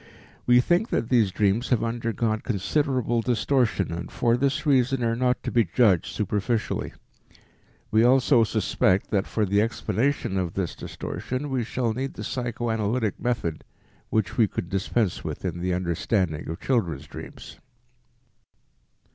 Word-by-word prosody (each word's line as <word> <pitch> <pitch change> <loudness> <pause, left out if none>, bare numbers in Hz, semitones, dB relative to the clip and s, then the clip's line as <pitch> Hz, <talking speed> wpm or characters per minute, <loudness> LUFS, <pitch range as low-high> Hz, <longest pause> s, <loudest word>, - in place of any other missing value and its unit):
We 125 0 +6
think 175 - +1
that 115 - -1
these 115 -6 +4
dreams 100 +5 +1
have 125 -3 +2
undergone 115 -1 -1
considerable 120 +2 0
distortion 120 -5 +1
and 85 0 -6
for 120 -1 +2
this 140 +4 0
reason 135 -2 +2
are 115 0 +1
not 125 +1 0
to - - -3
be 120 -2 +4
judged 105 -7 +3
superficially. 105 +2 -2 1.0
We 110 +1 +4
also 125 -1 +5
suspect 100 -3 +1
that 100 0 +1
for 110 - 0
the 100 +1 +2
explanation 115 -1 0
of 90 -2 -3
this 95 -4 -2
distortion 135 +3 -5
we 130 -2 0
shall 115 0 -1
need 135 +4 -4
the - - -6
psychoanalytic 115 -2 -1
method 115 -10 -2 0.5
which 110 -2 -1
we 115 -3 +5
could 85 - -5
dispense 100 +1 -1
with - - -5
in 85 - -3
the 90 +1 -1
understanding 85 -2 -1
of 80 - -5
children's 90 - -1
dreams. - - -10
115 Hz, 145 wpm, -25 LUFS, 100-125 Hz, 1.0 s, We